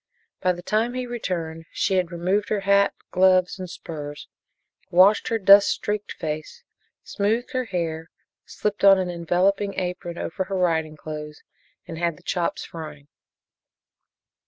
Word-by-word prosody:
By 185 Hz, -1 st, +2 dB
the 175 Hz, 0 st, -9 dB
time 225 Hz, +5 st, 0 dB
he 255 Hz, 0 st, -2 dB
returned 170 Hz, -9 st, -4 dB
she 190 Hz, -, 0 dB
had 180 Hz, -2 st, 0 dB
removed 185 Hz, +4 st, 0 dB
her 210 Hz, -2 st, 0 dB
hat, 200 Hz, 0 st, +3 dB, 0.2 s
gloves 185 Hz, 0 st, +3 dB
and 185 Hz, -1 st, -6 dB
spurs, 145 Hz, -3 st, -8 dB, 0.6 s
washed 190 Hz, +4 st, +5 dB
her 230 Hz, -, +1 dB
dust 200 Hz, 0 st, +7 dB
streaked 210 Hz, 0 st, -2 dB
face, 155 Hz, -1 st, -6 dB, 0.4 s
smoothed 220 Hz, +6 st, -1 dB
her 255 Hz, -2 st, -1 dB
hair, 165 Hz, -5 st, -3 dB, 0.3 s
slipped 210 Hz, -1 st, -4 dB
on 195 Hz, -1 st, +8 dB
an 185 Hz, -1 st, -1 dB
enveloping 185 Hz, +4 st, 0 dB
apron 180 Hz, -1 st, -4 dB
over 190 Hz, +3 st, -3 dB
her 195 Hz, 0 st, -3 dB
riding 160 Hz, -4 st, 0 dB
clothes 150 Hz, -1 st, -8 dB, 0.4 s
and 165 Hz, -2 st, -7 dB
had 170 Hz, -3 st, -1 dB
the -, -, -20 dB
chops 175 Hz, -1 st, -2 dB
frying. 150 Hz, -3 st, -9 dB
180 Hz, 145 wpm, -24 LUFS, 165-200 Hz, 0.6 s, on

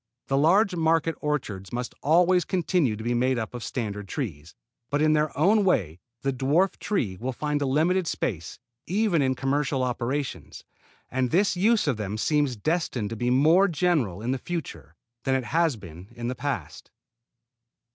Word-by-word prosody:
The 135 Hz, -, +2 dB
large 185 Hz, +7 st, +4 dB
market 165 Hz, 0 st, +2 dB
orchards 110 Hz, -11 st, -3 dB
must 120 Hz, 0 st, -4 dB
always 175 Hz, +4 st, +4 dB
continue 175 Hz, -, +1 dB
to 110 Hz, -, -8 dB
be 120 Hz, +1 st, 0 dB
made 125 Hz, +2 st, +1 dB
up 110 Hz, 0 st, -4 dB
of 120 Hz, -2 st, -6 dB
standard 105 Hz, -5 st, -4 dB
trees; 85 Hz, -, -5 dB, 0.3 s
but 145 Hz, -, 0 dB
in 155 Hz, 0 st, +4 dB
their 150 Hz, 0 st, +2 dB
own 200 Hz, +8 st, +4 dB
way 90 Hz, -, +1 dB, 0.2 s
the 135 Hz, 0 st, 0 dB
dwarf 145 Hz, +9 st, +1 dB
trees 110 Hz, -, -2 dB
will 130 Hz, +3 st, -2 dB
find 150 Hz, +2 st, -2 dB
a 140 Hz, -, 0 dB
limited 165 Hz, +6 st, +2 dB
place 85 Hz, -8 st, -3 dB, 0.3 s
even 195 Hz, -4 st, +2 dB
in 130 Hz, -1 st, +1 dB
commercial 135 Hz, 0 st, 0 dB
operations, 125 Hz, +3 st, -3 dB, 0.5 s
and 130 Hz, -1 st, 0 dB
this 190 Hz, +5 st, +2 dB
use 215 Hz, +5 st, +3 dB
of 140 Hz, -7 st, 0 dB
them 105 Hz, 0 st, -4 dB
seems 145 Hz, +1 st, +1 dB
destined 125 Hz, -4 st, -1 dB
to -, -, -3 dB
be 120 Hz, +2 st, -1 dB
more 160 Hz, +10 st, +5 dB
general 150 Hz, -, 0 dB
in 120 Hz, -, -1 dB
the 130 Hz, -, -1 dB
future 85 Hz, -, -6 dB, 0.3 s
than 135 Hz, -1 st, +1 dB
it 130 Hz, -, 0 dB
has 160 Hz, +2 st, +1 dB
been 90 Hz, -3 st, -11 dB
in 120 Hz, 0 st, -4 dB
the -, -, -1 dB
past. 120 Hz, -, -5 dB
135 Hz, 175 wpm, -26 LUFS, 120-165 Hz, 0.5 s, more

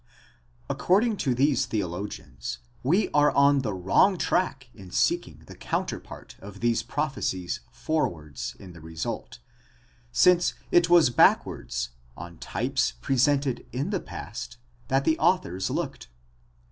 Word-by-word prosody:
According 210 Hz, +4 st, +2 dB
to 130 Hz, -8 st, 0 dB
these 135 Hz, 0 st, +2 dB
theologians, 90 Hz, -, -4 dB, 0.2 s
we 180 Hz, +11 st, +2 dB
are 150 Hz, 0 st, +5 dB
on 140 Hz, 0 st, +5 dB
the 110 Hz, -5 st, -2 dB
wrong 95 Hz, -, +3 dB
track 140 Hz, -8 st, 0 dB
in 95 Hz, -4 st, -12 dB
seeking -, -, 0 dB
the -, -, -12 dB
counterpart -, -, -5 dB
of 100 Hz, 0 st, -11 dB
these 120 Hz, -1 st, +1 dB
prophecies 135 Hz, -, -2 dB
forwards, 80 Hz, -, -3 dB
in 95 Hz, -2 st, -12 dB
the 85 Hz, -, -13 dB
result; 80 Hz, 0 st, -5 dB, 0.7 s
since 180 Hz, +6 st, +4 dB, 0.2 s
it 175 Hz, 0 st, +4 dB
was 170 Hz, -7 st, +6 dB
back -, -, +5 dB
wards, -, -, -4 dB, 0.3 s
on 85 Hz, 0 st, -9 dB
types -, -, -1 dB
presented 135 Hz, -, +1 dB
in 140 Hz, +10 st, -2 dB
the 195 Hz, -, 0 dB
past, 115 Hz, -2 st, -8 dB, 0.3 s
that 135 Hz, +1 st, +1 dB
the 160 Hz, 0 st, +2 dB
authors 95 Hz, -, +1 dB
looked. -, -, -4 dB
125 Hz, 130 wpm, -26 LUFS, -, 0.7 s, was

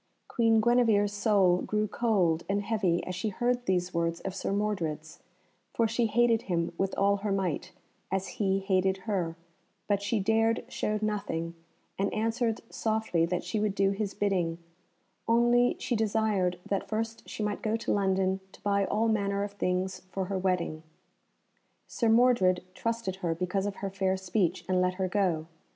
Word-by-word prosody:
Queen 225 Hz, -1 st, +3 dB
Guenevere's 220 Hz, -3 st, +3 dB
soul 200 Hz, -4 st, +3 dB
grew 215 Hz, 0 st, 0 dB
cold 195 Hz, -8 st, +1 dB
and 200 Hz, +1 st, +1 dB
heavy 195 Hz, -6 st, 0 dB
as 185 Hz, -, -4 dB
she 215 Hz, +4 st, -2 dB
heard 245 Hz, +4 st, 0 dB
these 180 Hz, -1 st, 0 dB
words 170 Hz, 0 st, 0 dB
of 190 Hz, -, -4 dB
Sir 195 Hz, -, -3 dB
Mordred's, 170 Hz, -7 st, -2 dB, 0.6 s
for 230 Hz, -, +3 dB
she 230 Hz, +1 st, +1 dB
hated 230 Hz, 0 st, +3 dB
him 170 Hz, -2 st, -1 dB
with 195 Hz, +2 st, -1 dB
all 200 Hz, +1 st, +3 dB
her 205 Hz, +1 st, -3 dB
might, 185 Hz, -2 st, -1 dB, 0.4 s
as 190 Hz, 0 st, -1 dB
he 195 Hz, -1 st, +2 dB
hated 190 Hz, 0 st, +1 dB
her; 180 Hz, -7 st, -1 dB, 0.5 s
but 200 Hz, -1 st, +1 dB
she 205 Hz, +2 st, 0 dB
dared 225 Hz, +3 st, +2 dB
show 215 Hz, 0 st, -1 dB
nothing, 195 Hz, -6 st, -2 dB, 0.5 s
and 195 Hz, -, +1 dB
answered 225 Hz, +1 st, 0 dB
softly 220 Hz, -7 st, 0 dB
that 180 Hz, 0 st, -2 dB
she 220 Hz, -, -2 dB
would 210 Hz, -2 st, 0 dB
do 195 Hz, 0 st, +3 dB
his 200 Hz, 0 st, -3 dB
bidding, 180 Hz, -5 st, 0 dB, 0.7 s
only 240 Hz, +1 st, +4 dB
she 240 Hz, -, -2 dB
desired 210 Hz, -4 st, +1 dB
that 195 Hz, -, -2 dB
first 225 Hz, +1 st, -3 dB
she 215 Hz, -, -4 dB
might 210 Hz, 0 st, -2 dB
go 220 Hz, 0 st, 0 dB
to 230 Hz, -, -3 dB
London 190 Hz, -1 st, +1 dB
to -, -, -16 dB
buy 200 Hz, -1 st, +1 dB
all 220 Hz, +3 st, +1 dB
manner 200 Hz, -2 st, +1 dB
of 205 Hz, -, -4 dB
things 185 Hz, -1 st, -1 dB
for 190 Hz, 0 st, -2 dB
her 195 Hz, +1 st, -2 dB
wedding. 180 Hz, -4 st, -1 dB, 1.0 s
Sir 230 Hz, -, 0 dB
Mordred 220 Hz, -7 st, +4 dB
trusted 230 Hz, -3 st, -2 dB
her 170 Hz, -3 st, -1 dB
because 185 Hz, +3 st, -1 dB
of 200 Hz, -, -4 dB
her 195 Hz, -, -4 dB
fair 190 Hz, -1 st, 0 dB
speech, 185 Hz, -1 st, -1 dB
and 185 Hz, -1 st, +2 dB
let 180 Hz, 0 st, +1 dB
her 190 Hz, 0 st, -1 dB
go. 180 Hz, -5 st, 0 dB
200 Hz, 170 wpm, -29 LUFS, 185-220 Hz, 1.0 s, only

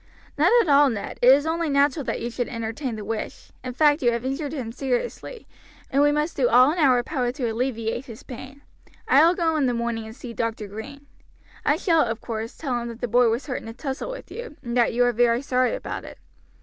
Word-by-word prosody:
"None -, -, +4 dB
at -, -, -7 dB
all, 285 Hz, -1 st, +6 dB
Ned, 220 Hz, -5 st, -5 dB
it 250 Hz, -, +8 dB
is 285 Hz, +2 st, +4 dB
only 325 Hz, 0 st, -1 dB
natural 285 Hz, +1 st, +2 dB
that -, -, -2 dB
you 235 Hz, +1 st, -4 dB
should 245 Hz, 0 st, -2 dB
entertain 230 Hz, +2 st, -4 dB
the 210 Hz, -1 st, -7 dB
wish; 225 Hz, -1 st, -5 dB
in 255 Hz, -1 st, -5 dB
fact 295 Hz, +2 st, +3 dB
you 240 Hz, -2 st, +3 dB
have 235 Hz, +1 st, -3 dB
injured 275 Hz, +2 st, -3 dB
him 255 Hz, -7 st, -5 dB
seriously, 275 Hz, -, -3 dB, 0.5 s
and 275 Hz, -, +3 dB
we 290 Hz, 0 st, +5 dB
must 300 Hz, +2 st, -1 dB
do 250 Hz, -3 st, +2 dB
all 255 Hz, +4 st, +6 dB
in 345 Hz, -, -3 dB
our 255 Hz, -5 st, +4 dB
power 250 Hz, -3 st, -1 dB
to 260 Hz, -3 st, -2 dB
alleviate 230 Hz, 0 st, -2 dB
his 230 Hz, -3 st, -11 dB
pain. 265 Hz, +3 st, -10 dB, 0.4 s
I 280 Hz, +4 st, +6 dB
will 340 Hz, +2 st, +4 dB
go 330 Hz, -3 st, +1 dB
in 280 Hz, -3 st, +2 dB
the 245 Hz, -, 0 dB
morning 235 Hz, -1 st, -2 dB
and 220 Hz, -, -10 dB
see 245 Hz, -2 st, -8 dB
Dr. 225 Hz, -2 st, -3 dB
Green. 275 Hz, +8 st, -9 dB, 0.6 s
I -, -, +3 dB
shall, 330 Hz, -4 st, +2 dB
of 225 Hz, -3 st, -1 dB
course, 225 Hz, -1 st, -5 dB
tell 250 Hz, -6 st, -2 dB
him 235 Hz, -, -5 dB
that 230 Hz, -1 st, -8 dB
the 245 Hz, -, -2 dB
boy 240 Hz, +1 st, +4 dB
was 230 Hz, +4 st, -1 dB
hurt 255 Hz, -, -4 dB
in -, -, -11 dB
a 225 Hz, -, -7 dB
tussle 270 Hz, -, -4 dB
with -, -, -8 dB
you, 475 Hz, -10 st, -8 dB
and 235 Hz, 0 st, -4 dB
that 240 Hz, -2 st, +3 dB
you 245 Hz, +1 st, +2 dB
are 245 Hz, -, +2 dB
very 240 Hz, +2 st, +2 dB
sorry 255 Hz, -, +1 dB
about -, -, -6 dB
it. -, -, -11 dB
255 Hz, 240 wpm, -24 LUFS, 235-290 Hz, 0.6 s, it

